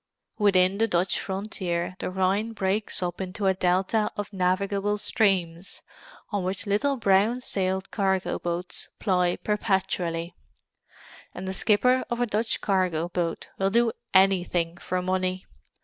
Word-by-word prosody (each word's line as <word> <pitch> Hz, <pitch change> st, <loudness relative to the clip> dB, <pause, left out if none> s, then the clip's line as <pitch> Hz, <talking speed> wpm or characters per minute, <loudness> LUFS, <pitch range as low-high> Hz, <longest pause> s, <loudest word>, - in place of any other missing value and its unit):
Within 195 Hz, -1 st, +3 dB
the 225 Hz, -, +3 dB
Dutch 180 Hz, -2 st, +1 dB
frontier 185 Hz, -3 st, -3 dB
the -, -, -3 dB
Rhine 190 Hz, +4 st, 0 dB
breaks 200 Hz, -1 st, 0 dB
up 175 Hz, +1 st, -3 dB
into 190 Hz, +2 st, -4 dB
a 190 Hz, -, +4 dB
delta 190 Hz, +4 st, +1 dB
of 205 Hz, 0 st, -5 dB
navigable 195 Hz, +2 st, 0 dB
streams, 190 Hz, -4 st, 0 dB, 0.5 s
on 205 Hz, -3 st, -1 dB
which 190 Hz, +4 st, -2 dB
little 215 Hz, +8 st, +1 dB
brown 210 Hz, +2 st, +3 dB
sailed 190 Hz, -5 st, -2 dB
cargo 190 Hz, -3 st, 0 dB
boats 175 Hz, +1 st, -4 dB
ply 180 Hz, -3 st, +1 dB
perpetually; 185 Hz, -5 st, -1 dB, 1.0 s
and 185 Hz, +1 st, -6 dB
the 190 Hz, -, -2 dB
skipper 250 Hz, +6 st, +3 dB
of 240 Hz, -1 st, -2 dB
a 245 Hz, -, +2 dB
Dutch 220 Hz, 0 st, -1 dB
cargo 180 Hz, -4 st, 0 dB
boat 175 Hz, -2 st, -3 dB
will 195 Hz, 0 st, +2 dB
do 230 Hz, +2 st, +3 dB, 0.2 s
anything 180 Hz, -3 st, +3 dB
for 180 Hz, +1 st, -3 dB
money. 185 Hz, 0 st, -1 dB
190 Hz, 135 wpm, -26 LUFS, 180-205 Hz, 1.0 s, a